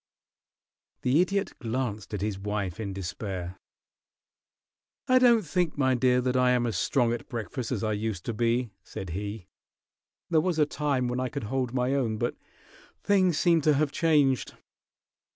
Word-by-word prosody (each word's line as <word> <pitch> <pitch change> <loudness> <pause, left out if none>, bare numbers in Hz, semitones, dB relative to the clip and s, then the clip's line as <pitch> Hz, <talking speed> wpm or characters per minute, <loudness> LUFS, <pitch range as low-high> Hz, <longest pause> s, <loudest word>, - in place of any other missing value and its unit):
The 135 +6 +4
Idiot 200 +2 0
glanced 115 -4 -3
at 100 - -4
his 105 -2 -2
wife 105 -1 -3
in 105 -3 -3
despair. 95 -1 -5 1.5
"I 255 0 +5
don't 240 -3 +5
think, 175 0 -1
my 130 -2 +3
dear, 125 0 +3
that 125 0 -1
I 125 0 +4
am 125 -1 +2
as 115 -4 -2
strong 120 +6 +1
at 120 - -6
breakfast 120 +1 -4
as 115 -4 -2
I 110 -1 0
used 105 -3 -3
to 115 - -2
be," 120 +1 0
said 95 -3 -7
he. 100 +2 -5 0.9
"There 160 -2 +4
was 175 -1 -1
a 150 - +4
time 145 -4 -1
when 125 +1 -2
I 130 0 -1
could 140 -1 -5
hold 125 +3 -1
my 125 +1 0
own, 120 -6 0
but - - -1 0.7
things 185 -5 +3
seem 170 -2 +3
to 150 0 +3
have 145 0 +1
changed. 145 -6 +2
125 Hz, 170 wpm, -27 LUFS, 105-145 Hz, 1.5 s, I